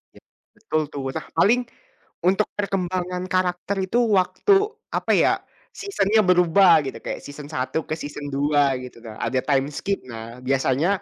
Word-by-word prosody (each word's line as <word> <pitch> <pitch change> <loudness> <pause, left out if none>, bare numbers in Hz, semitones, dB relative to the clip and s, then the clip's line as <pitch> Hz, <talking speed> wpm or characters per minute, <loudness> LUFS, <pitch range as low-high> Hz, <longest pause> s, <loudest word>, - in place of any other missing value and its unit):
Iya, - - -17 0.3
betul 210 -7 -1
tuh. 140 - -4
Nah, - - -4
paling 245 +5 +4 0.7
untuk 195 +3 +2
perkembangan 180 -2 -2
karakter 185 +2 0
itu 235 - 0 0.2
waktu, 185 - +1 0.4
apa - - 0
ya, - - +4 0.4
season-nya 220 - +1
berubah 180 0 +5
gitu. - - -5
Kayak - - -4
season 145 0 -9
1 145 +2 -3
ke - - -2
season 145 -2 -7
2 145 -1 +2
gitu 125 -2 -10
Kak, 110 -2 -9
ada 120 +3 0
time 135 -1 +3
skip. 195 +6 -2
Nah 115 +2 -9
biasanya 135 +4 +1
165 Hz, 155 wpm, -23 LUFS, 135-190 Hz, 0.7 s, berubah